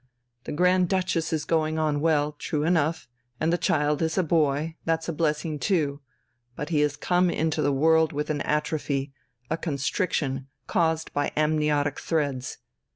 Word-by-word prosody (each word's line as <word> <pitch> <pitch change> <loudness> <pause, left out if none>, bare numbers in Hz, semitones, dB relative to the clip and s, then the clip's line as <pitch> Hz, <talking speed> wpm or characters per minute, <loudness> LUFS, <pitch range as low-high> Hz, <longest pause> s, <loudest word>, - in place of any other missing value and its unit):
The - - -5
Grand 180 +2 +3
Duchess 185 -3 0
is 155 -1 -1
going 160 -1 +1
on 155 -2 +1
well 150 -2 +2
true 150 0 -3
enough, 160 -4 +1 0.3
and 160 +2 +1
the - - +3
child 150 0 +1
is 160 +1 0
a 185 - +3
boy 155 -1 +1
that's 165 0 -1
a 170 - -2
blessing 155 -1 -1
too. 150 -7 0 0.5
But 150 +3 -5
he 155 -3 +1
has 145 -1 +1
come 180 0 +2
into 160 -2 0
the 145 -1 +2
world 160 +3 +3
with 150 +1 -2
an 145 -2 -2
atrophy, 145 -2 -1 0.4
a 160 - +1
constriction, 140 -3 -1 0.2
caused 160 -1 0
by 145 0 0
amniotic 150 -2 +1
threads. 140 -6 -2
155 Hz, 160 wpm, -26 LUFS, 145-165 Hz, 0.5 s, Grand